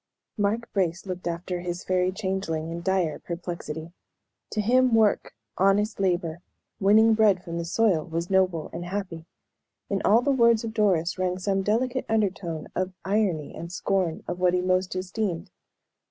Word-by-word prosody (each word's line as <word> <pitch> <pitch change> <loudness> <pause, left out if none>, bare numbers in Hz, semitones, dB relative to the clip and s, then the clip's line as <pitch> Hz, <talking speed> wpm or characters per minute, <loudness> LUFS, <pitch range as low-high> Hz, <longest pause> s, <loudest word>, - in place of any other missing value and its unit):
Mark 215 +2 0
Brace 185 -2 0
looked 185 -2 -5
after 175 +1 -3
his 175 0 -4
Fairy 185 0 +1
Changeling 190 -5 -3
in 170 +1 -5
dire 180 -4 0
perplexity. 170 -2 -6 0.6
To 215 - -3
him 250 +3 +4
work, 220 -2 +2 0.2
honest 200 +3 +2
labor 175 -3 0 0.4
winning 220 +3 +5
bread 210 -4 +3
from 170 -1 -4
the 170 - -3
soil, 185 -3 +2
was 170 0 -3
noble 185 -4 +1
and 170 - -5
happy; 180 -3 -5 0.6
in 195 - 0
all 225 +4 +4
the 280 - +2
words 235 -4 +4
of 225 -1 -4
Doris 190 -5 +1
rang 180 0 0
some 195 +1 0
delicate 245 +6 0
undertone 190 -7 -1
of 185 +1 -1
irony 190 -7 0
and 170 +1 -7
scorn, 185 -2 -1
of 175 - -4
what 180 0 +3
he 180 - +1
most 185 0 0
esteemed. 185 -1 -3
185 Hz, 160 wpm, -26 LUFS, 175-210 Hz, 0.6 s, winning